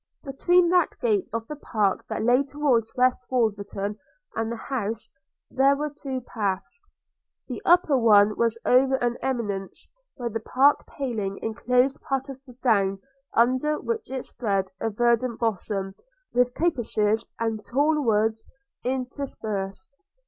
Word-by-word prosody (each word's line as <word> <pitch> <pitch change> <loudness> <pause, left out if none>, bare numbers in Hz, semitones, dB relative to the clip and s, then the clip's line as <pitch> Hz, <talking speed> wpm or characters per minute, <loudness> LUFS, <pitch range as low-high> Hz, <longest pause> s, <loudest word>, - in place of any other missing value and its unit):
Between 345 +6 +3
that 355 -2 +2
gate 210 -5 +1
of 230 +1 -3
the 300 - -6
park 215 -9 0
that - - -2
lay 245 +3 +4
towards 270 -5 0
West 255 0 +3
Wolverton, 205 -3 -1 0.4
and 225 0 -1
the - - -2
house, 225 -2 -4 0.4
there 270 +1 +4
were 300 +1 -3
two 265 -3 -4
paths. 210 - -4 0.6
The - - -5
upper 350 -5 +5
one 210 -4 +5
was 230 -1 +1
over 265 +2 +4
an 240 -2 0
eminence 205 -7 -3 0.2
where 245 -3 -3
the 225 - -2
park 270 +6 +3
paling 220 -8 -3
enclosed 250 +4 +1
part 270 0 -2
of 265 -1 -8
the 250 - -12
down, 200 -5 +3 0.4
under 255 +6 +2
which 450 -2 -3
it 260 -1 -4
spread 195 -5 -2
a 225 - 0
verdant 235 +2 +1
bosom, 200 -3 -2 0.4
with 245 0 +2
coppices 225 -9 +1
and 225 -2 -2
tall 295 +6 +1
woods 220 -2 +1 0.4
interspersed. 245 -6 -4
240 Hz, 140 wpm, -25 LUFS, 215-270 Hz, 0.6 s, upper